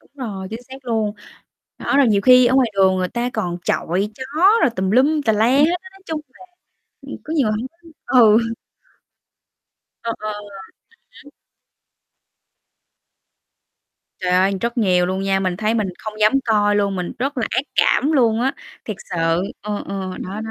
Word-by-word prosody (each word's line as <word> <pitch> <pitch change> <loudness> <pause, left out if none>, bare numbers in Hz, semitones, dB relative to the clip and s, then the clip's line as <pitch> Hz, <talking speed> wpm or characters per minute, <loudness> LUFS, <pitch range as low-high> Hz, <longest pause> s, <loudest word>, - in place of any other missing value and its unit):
Đúng - - -28 0.2
rồi, 190 -2 -6
chính 225 +3 -7
xác 260 +2 -12
luôn. 220 -3 -1 0.6
Đó, 275 - -1
rồi 280 -3 +5
nhiều 205 -3 +3
khi 250 +2 +6
ở 255 - +2
ngoài 255 -4 +3
đường 190 -1 +4
người 185 -1 -1
ta 240 +1 -2
còn 175 -5 -3
chọi 190 +5 -1
chó 260 - -7 0.4
rồi 250 - +4
tùm 190 0 -1
lum 285 +6 +3
tà 220 - +3
la 215 +2 +2
hết 275 +4 +4 0.2
á, 375 - -12
nói 390 - -19
chung 315 -1 -3
là, 370 +8 -17 0.6
ưm, - - -8
có 315 - -5
nhiều 270 -9 +2
hông 220 +5 -3 0.4
có 255 - +3
ừ. 220 -2 +7 1.7
Ờ, 230 - -2
ờ. 215 0 -3
Ừm 210 0 -8 0.8
hứm. 285 - -16 2.9
Trời 180 -1 -1
ơi, 190 +2 +3
rất 235 +1 -2
nhiều 180 -5 +2
luôn 190 +1 -2
nha, 195 0 +1
mình 185 -2 -1
thấy 215 +2 0
mình 210 -4 0
không 215 - -6
dám 215 +3 +5
coi 205 -2 +2
luôn, 200 -2 0
mình 180 -1 -4
rất 275 +3 -2
là 225 - 0
ác 260 - 0
cảm 295 +4 +3
luôn 235 -5 +3
á. 265 +2 +1 0.3
Thiệt 215 -3 -5
sự, 165 0 0 0.2
ừ, 210 0 -4
ừ, 190 -1 -4 0.2
đó, 200 +3 -6
đó. 220 - -6
215 Hz, 185 wpm, -20 LUFS, 195-250 Hz, 2.9 s, ừ